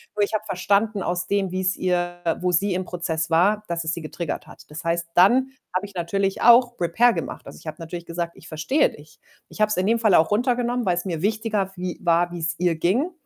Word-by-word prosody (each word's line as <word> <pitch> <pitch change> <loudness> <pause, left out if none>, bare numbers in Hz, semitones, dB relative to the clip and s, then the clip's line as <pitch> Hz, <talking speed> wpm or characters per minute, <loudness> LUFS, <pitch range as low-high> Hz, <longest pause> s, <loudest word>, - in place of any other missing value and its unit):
Nur 205 - +2
ich 200 - -2
habe 215 0 0
verstanden 200 +2 0
aus 180 +1 -2
dem, 200 -2 0
wie's 185 0 0
ihr 175 -1 -1 0.2
wo 180 0 +1
sie 195 +3 +1
im 185 0 -2
Prozess 165 -2 -3
war. 200 +6 +3
Dass 170 -1 -2
es 160 +1 -1
sie 170 - -5
getriggert 160 0 -5
hat. - - -14
Das 155 - -7
heißt, 170 0 -1
dann 250 +9 +4 0.2
habe 185 - 0
ich 200 - -12
natürlich 195 +3 -1
auch 240 +1 +5
Repair 230 +8 +4
gemacht. - - -5
Also, - - -11
ich - - -15
habe 155 - -5
natürlich 170 +1 -7
gesagt: 170 0 -3
„Ich 165 - -14
verstehe 215 - +1
dich.“ 150 +1 -16 0.3
Ich - - -7
habe 215 - +4
es 215 - -1
in 185 - +1
dem 230 +3 +2
Fall 215 -4 +4
auch 160 - +4
runtergenommen, 245 +1 +1
weil's 175 0 0
mir 170 -4 -3
wichtiger 210 -2 -1
wie 180 -1 -5
war, 175 0 +2
wie's 170 -1 -2
ihr 175 -1 +2
ging. 210 - +1
180 Hz, 230 wpm, -23 LUFS, 170-210 Hz, 0.3 s, auch